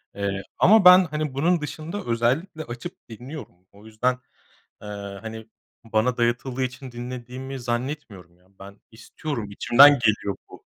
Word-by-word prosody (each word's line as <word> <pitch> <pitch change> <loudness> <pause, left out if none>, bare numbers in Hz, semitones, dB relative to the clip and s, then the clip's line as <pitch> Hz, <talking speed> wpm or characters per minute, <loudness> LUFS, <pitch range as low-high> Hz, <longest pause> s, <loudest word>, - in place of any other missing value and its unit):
Iıı, 100 -1 -2 0.2
ama 210 0 +6
ben, 180 +1 +9
hani, 150 -2 -3
bunun 165 +5 +1
dışında 160 +6 -6
özellikle 130 +9 -1
açıp 120 0 -9
dinliyorum. 125 - -9 0.2
O 100 +2 -18
yüzden, 110 +4 0 0.7
eee, 105 - -10 0.3
hani, 110 0 -8 0.4
bana 115 +3 0
dayatıldığı 120 +2 0
için 130 0 -6
dinlediğimi 125 +2 -7
zannetmiyorum, 120 - -5
ya. 90 - -29
Ben 100 +1 -13
istiyorum, 115 0 -6
içimden 125 +7 +7
geliyor 105 -3 +1
bu. - - -14
125 Hz, 135 wpm, -24 LUFS, 110-145 Hz, 0.7 s, ben